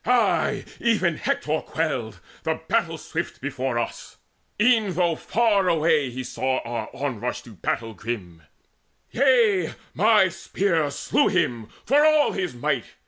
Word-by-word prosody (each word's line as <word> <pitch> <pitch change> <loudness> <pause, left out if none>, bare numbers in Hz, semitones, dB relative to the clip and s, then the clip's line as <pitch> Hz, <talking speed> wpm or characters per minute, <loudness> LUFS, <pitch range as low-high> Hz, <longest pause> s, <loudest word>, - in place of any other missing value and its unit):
Ay, 220 -3 +2
even 200 -8 +2
Hector 155 +1 -1
quailed, 120 - -3 0.2
the - - -2
battle - - 0
swift, - - -5
Before 130 -3 -3
us, 120 - -5 0.4
e'en 220 -4 +3
though 175 -2 +2
far 210 -1 +1
away 155 -4 +2
he 130 +1 -5
saw 130 +1 -1
Our 115 -2 -5
onrush 125 -4 -4
to 120 - -13
grim 95 - -21
battle. 110 -6 -4 0.7
Yea, 230 - +3 0.2
my 210 +1 +5
spear 170 -2 -1
Slew - - +1
him, 115 -3 0 0.2
for 285 +5 +4
all 310 -1 +4
his 180 -8 -3
might. 130 -1 -1
160 Hz, 135 wpm, -24 LUFS, 125-210 Hz, 0.7 s, my